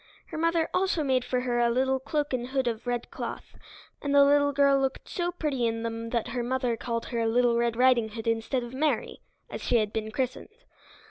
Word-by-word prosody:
Her - - -6
mother 330 0 +2
also 365 -4 +1
made 260 -3 +1
for 250 0 -1
her 245 -1 0
a 240 0 +3
little 265 +2 +1
cloak 290 +1 -2
and 245 -1 -1
hood 265 0 -1
of 230 +1 -3
red 245 -1 -2
cloth, - - -6 0.5
and 285 -1 0
the 280 0 +8
little 285 0 +4
girl 280 -1 +4
looked 270 0 -2
so 350 -1 -2
pretty 285 -8 -1
in 225 0 -2
them 230 0 -4
that 235 -1 -1
her 245 +1 -2
mother 250 0 0
called 230 0 -3
her 230 -2 0
Little 240 +1 +3
Red 235 -1 +1
Riding 245 -2 +4
Hood 225 +1 -7
instead 230 +3 0
of 240 +1 -8
Mary, 300 +3 -1 0.3
as - - -7
she - - 0
had 215 -2 +1
been 220 -1 -2
christened. 255 +3 -3
250 Hz, 215 wpm, -27 LUFS, 235-280 Hz, 0.5 s, the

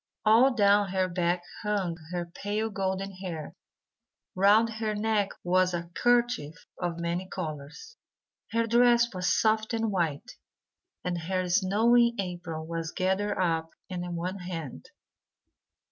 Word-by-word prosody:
All 230 +5 +6
down 205 -2 +4
her 185 0 +1
back 175 0 0 0.2
hung 200 -5 -1 0.2
her 175 -1 -2
pale 205 +5 -3
golden 195 0 -2
hair; 180 -5 -6 0.8
round 205 +4 +5
her 220 -1 -3
neck 210 -1 +1
was 185 0 +2
a 170 0 -5
kerchief 240 - +1 0.2
of 175 -1 -2
many 170 +2 -2
colours; 160 - -7 0.5
her 230 0 +1
dress 235 0 +4
was 180 0 0
soft 220 +1 +2
and 225 -1 0
white, 165 -7 -2 0.7
and 175 -1 -2
her 185 +2 -2
snowy 230 +5 +4
apron 175 -4 -4
was 165 -1 -3
gathered 190 +3 0
up 165 -3 0 0.2
in 175 -1 -4
one 180 +3 -3
hand. 165 - -6
185 Hz, 130 wpm, -28 LUFS, 175-215 Hz, 0.8 s, All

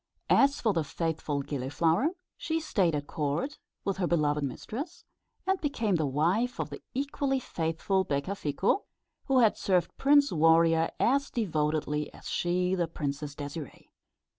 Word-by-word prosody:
As 280 0 +5
for 220 -3 +2
the 165 -3 +1
faithful 150 -2 -2
Gilliflower, 155 - +1 0.3
she 320 0 -2
stayed 195 - +1
at 145 -1 -3
court, 155 - -2 0.3
with 195 -2 -1
her 185 -2 0
beloved 150 -3 +1
mistress, 250 - -5 0.4
and 380 0 +1
became 225 - 0
the 155 -2 0
wife 180 - +1
of - - -3
the - - -7
equally 275 0 0
faithful 170 -1 -1
Becafico, 170 - -1 0.4
who 265 -2 +4
had 220 -3 +4
served 180 -3 +1
Prince 285 0 +5
Warrior 165 0 +4
as 280 +3 +2
devotedly 150 -7 -1
as - - -11
she 180 +1 0
the 175 -3 +1
Princess 145 -2 -4
Désirée. 145 +1 -7
170 Hz, 140 wpm, -29 LUFS, 150-245 Hz, 0.4 s, As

